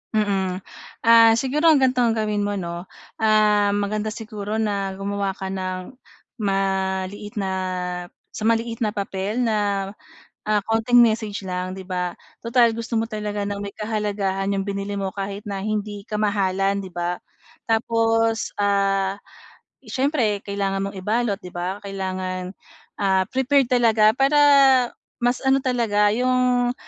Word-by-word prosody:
Mm. 195 Hz, -3 st, 0 dB, 0.4 s
Ah, 230 Hz, 0 st, +7 dB
siguro 275 Hz, +7 st, +1 dB
ang 295 Hz, -4 st, +6 dB
ganito 255 Hz, -1 st, +2 dB
ang 230 Hz, -2 st, +3 dB
gawin 210 Hz, -1 st, -1 dB
mo, 205 Hz, 0 st, -1 dB
'no? 175 Hz, -1 st, -5 dB, 0.3 s
Ah, 210 Hz, -2 st, +3 dB
maganda 210 Hz, +1 st, -1 dB
siguro 215 Hz, -1 st, -5 dB
na 200 Hz, -3 st, -1 dB
gumawa 195 Hz, 0 st, -2 dB
ka 190 Hz, 0 st, -5 dB
ng 185 Hz, +2 st, -4 dB, 0.5 s
maliit 195 Hz, 0 st, -1 dB
na 195 Hz, -2 st, -2 dB, 0.8 s
sa 215 Hz, -, -7 dB
maliit 230 Hz, 0 st, 0 dB
na 215 Hz, -1 st, -1 dB
papel 200 Hz, +3 st, -2 dB
na, 205 Hz, -3 st, 0 dB, 0.5 s
ah, 215 Hz, 0 st, +2 dB
konting 225 Hz, +2 st, +3 dB
message 220 Hz, -3 st, +2 dB
lang, 180 Hz, 0 st, -3 dB
'di 190 Hz, 0 st, -8 dB
ba? 180 Hz, -1 st, -3 dB, 0.2 s
Tutal 230 Hz, -1 st, +3 dB
gusto 230 Hz, 0 st, -2 dB
mo 225 Hz, -, -1 dB
talaga 210 Hz, -2 st, -3 dB
ng 200 Hz, 0 st, -4 dB
may 200 Hz, -, -5 dB
kahalagahan 205 Hz, -3 st, -2 dB
'yong 195 Hz, 0 st, -2 dB
binili 200 Hz, 0 st, -3 dB
mo 195 Hz, -, -1 dB
kahit 200 Hz, +1 st, -5 dB
na 195 Hz, -1 st, -4 dB
hindi 210 Hz, -1 st, -3 dB
kamahalan, 200 Hz, -2 st, 0 dB
'di 185 Hz, -, -9 dB
ba? 175 Hz, +1 st, -2 dB, 0.5 s
Tapos, 225 Hz, 0 st, +1 dB
ah, 195 Hz, -1 st, +1 dB, 0.7 s
siyempre 235 Hz, -4 st, 0 dB
kailangan 195 Hz, -1 st, -2 dB
mong 200 Hz, -, -10 dB
ibalot, 220 Hz, -2 st, +1 dB
'di 180 Hz, -4 st, -12 dB
ba? 180 Hz, +2 st, -3 dB
Kailangan, 185 Hz, -1 st, -4 dB, 0.5 s
ah, 190 Hz, -2 st, +1 dB
prepared 265 Hz, 0 st, +2 dB
talaga 225 Hz, -4 st, +4 dB
para, 275 Hz, +2 st, +4 dB, 0.8 s
mas 245 Hz, +1 st, +2 dB
ano 270 Hz, 0 st, +4 dB
talaga 225 Hz, -5 st, +2 dB
'yong, 250 Hz, +1 st, +2 dB
205 Hz, 140 wpm, -23 LUFS, 195-225 Hz, 0.8 s, Ah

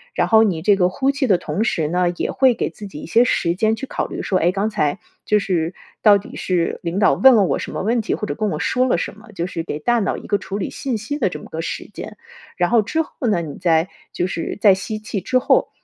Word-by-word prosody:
然 -, -, +1 dB
后 220 Hz, -1 st, +6 dB
你 175 Hz, -7 st, 0 dB
这 205 Hz, +3 st, +4 dB
个 180 Hz, -2 st, +2 dB
呼 265 Hz, +9 st, 0 dB
气 280 Hz, -2 st, -1 dB
的 190 Hz, -5 st, +4 dB
同 210 Hz, -, -2 dB
时 160 Hz, -9 st, 0 dB
呢， 180 Hz, +2 st, +1 dB
也 -, -, -1 dB
会 260 Hz, -2 st, +4 dB
给 -, -, -2 dB
自 205 Hz, -, -10 dB
己 150 Hz, -6 st, -9 dB
一 -, -, -8 dB
些 230 Hz, +8 st, +4 dB
时 170 Hz, -8 st, +1 dB
间 220 Hz, +2 st, +2 dB
去 270 Hz, -, -5 dB
考 -, -, -3 dB
虑 -, -, -5 dB
说， 185 Hz, -, 0 dB
诶， 175 Hz, -, +3 dB
刚 200 Hz, +3 st, -1 dB
才 185 Hz, -6 st, -1 dB, 0.2 s
就 210 Hz, -, +2 dB
是 175 Hz, -4 st, -1 dB, 0.3 s
到 205 Hz, -2 st, +7 dB
底 200 Hz, -, -10 dB
是 180 Hz, -3 st, -1 dB
领 175 Hz, +3 st, -2 dB
导 210 Hz, -, +4 dB
问 265 Hz, -2 st, +6 dB
了 205 Hz, -, +5 dB
我 -, -, +1 dB
什 -, -, -6 dB
么 -, -, -4 dB
问 230 Hz, +3 st, +1 dB
题， 220 Hz, -, -1 dB
或 210 Hz, -, -4 dB
者 -, -, -3 dB
跟 215 Hz, -1 st, -1 dB
我 -, -, -3 dB
说 255 Hz, 0 st, +1 dB
了 -, -, +2 dB
什 170 Hz, -, -3 dB
么， 220 Hz, 0 st, -15 dB
就 175 Hz, -3 st, -3 dB
是 165 Hz, -2 st, -4 dB
给 150 Hz, -2 st, -5 dB
大 240 Hz, +8 st, +2 dB
脑 200 Hz, -, -1 dB
一 -, -, -10 dB
个 205 Hz, -, +2 dB
处 200 Hz, 0 st, -6 dB
理 200 Hz, -, -3 dB
信 260 Hz, -5 st, -3 dB
息 240 Hz, +8 st, -4 dB
的 -, -, +1 dB
这 -, -, -7 dB
么 -, -, -12 dB
个 -, -, -4 dB
时 -, -, -5 dB
间。 -, -, -8 dB, 0.4 s
然 175 Hz, -1 st, +1 dB
后 235 Hz, -2 st, +4 dB
之 320 Hz, +10 st, -1 dB
后 320 Hz, -, -8 dB, 0.2 s
呢， 175 Hz, -5 st, +1 dB
你 150 Hz, -4 st, -7 dB
在 165 Hz, -1 st, +2 dB, 0.2 s
就 180 Hz, -, -1 dB
是 170 Hz, -3 st, -4 dB
在 200 Hz, -2 st, +6 dB
吸 215 Hz, +3 st, -4 dB
气 215 Hz, -2 st, -4 dB
之 255 Hz, +5 st, +1 dB
后， -, -, +2 dB
205 Hz, 305 characters per minute, -20 LUFS, 180-225 Hz, 0.4 s, 到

